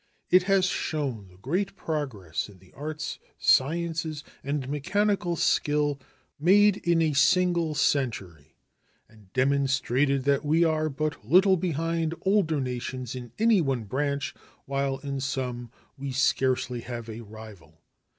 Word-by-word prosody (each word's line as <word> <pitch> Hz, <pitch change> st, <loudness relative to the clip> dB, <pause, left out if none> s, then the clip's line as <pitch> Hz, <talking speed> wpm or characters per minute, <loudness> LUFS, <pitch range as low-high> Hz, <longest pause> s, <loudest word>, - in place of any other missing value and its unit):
It 185 Hz, +1 st, +7 dB
has 195 Hz, -1 st, +4 dB
shown 140 Hz, -, -2 dB
the 90 Hz, 0 st, -19 dB
great 180 Hz, -, -2 dB
progress 125 Hz, -, -3 dB
in 100 Hz, -, -15 dB
the 90 Hz, 0 st, -22 dB
arts, 155 Hz, +2 st, -5 dB, 0.2 s
sciences, 160 Hz, +1 st, +1 dB, 0.2 s
and 140 Hz, -1 st, -2 dB
mechanical 185 Hz, +5 st, 0 dB
skill 145 Hz, -2 st, +1 dB, 0.4 s
made 200 Hz, +5 st, +5 dB
in 170 Hz, -1 st, +2 dB
a 155 Hz, -2 st, +1 dB
single 170 Hz, +2 st, +3 dB
century, 100 Hz, -, -1 dB, 0.5 s
and 105 Hz, -4 st, -21 dB
demonstrated 135 Hz, 0 st, +1 dB
that 140 Hz, +1 st, +2 dB
we 155 Hz, +3 st, +3 dB
are 155 Hz, -1 st, +1 dB
but 155 Hz, +1 st, -3 dB
little 185 Hz, -, +5 dB
behind 165 Hz, -1 st, -1 dB
older 190 Hz, -6 st, +2 dB
nations 125 Hz, -1 st, -4 dB
in 125 Hz, -3 st, -8 dB
any 225 Hz, -3 st, +4 dB
one 135 Hz, -6 st, -1 dB
branch, 140 Hz, +6 st, -2 dB, 0.3 s
while 135 Hz, 0 st, -1 dB
in 140 Hz, 0 st, -4 dB
some 125 Hz, -3 st, -3 dB, 0.3 s
we 140 Hz, 0 st, -4 dB
scarcely 130 Hz, -1 st, +1 dB
have 120 Hz, -2 st, -6 dB
a 115 Hz, +1 st, -7 dB
rival. 105 Hz, -8 st, -13 dB
140 Hz, 130 wpm, -27 LUFS, 125-165 Hz, 0.5 s, It